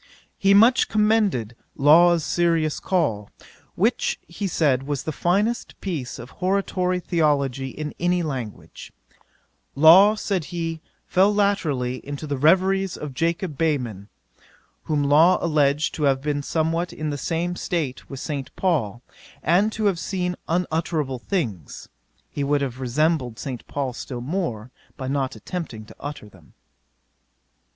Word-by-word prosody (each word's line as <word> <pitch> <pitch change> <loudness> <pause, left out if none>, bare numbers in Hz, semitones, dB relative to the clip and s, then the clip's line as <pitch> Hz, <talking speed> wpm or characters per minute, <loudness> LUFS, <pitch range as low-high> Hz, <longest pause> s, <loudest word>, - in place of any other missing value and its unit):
'He 195 -1 +4
much 230 +5 +5
commended 210 - +1 0.2
Law's 165 +4 +5
Serious 165 -2 +1
Call, 110 - -1 0.5
which - - +1
he 185 +5 -4
said 145 -7 +2
was 140 0 -3
the 155 - -3
finest 200 +9 -1
piece 155 -11 -4
of 120 +2 -10
hortatory 185 -1 0
theology 140 -6 0
in 150 +3 -6
any 175 0 +1
language. 130 -8 -6 0.8
"Law, 180 +9 +7
(said 195 -6 -2
he,) 165 -2 -4 0.2
fell 195 +2 +3
latterly 160 -12 0
into 145 +2 -6
the 145 -1 -2
reveries 190 +4 +3
of 150 -3 -6
Jacob 165 +1 -2
Behmen, 125 -11 -1 0.8
whom 150 -2 0
Law 155 +6 +5
alledged 150 -2 +1
to 155 - -4
have 135 -1 +3
been 145 +1 -2
somewhat 165 +4 -1
in 155 -1 -4
the - - -2
same 170 +5 -2
state 155 -8 -3
with 135 - -7
St. 140 -3 -4
Paul, 125 - -1 0.4
and 190 +7 +3
to 215 0 -3
have 195 -4 +2
seen 180 -1 -2
_unutterable 160 -6 -1
things 115 - -4 0.4
he 145 - -3
would 145 +1 +1
have 130 -2 -3
resembled 130 -2 0
St. 130 -4 -6
Paul 135 -3 -3
still 120 0 -6
more, 125 - -3 0.3
by 130 -2 -5
not 135 -1 -1
attempting 150 -12 -6
to - - -15
utter 145 -6 -7
them." 95 -6 -20
155 Hz, 140 wpm, -23 LUFS, 135-180 Hz, 0.8 s, Law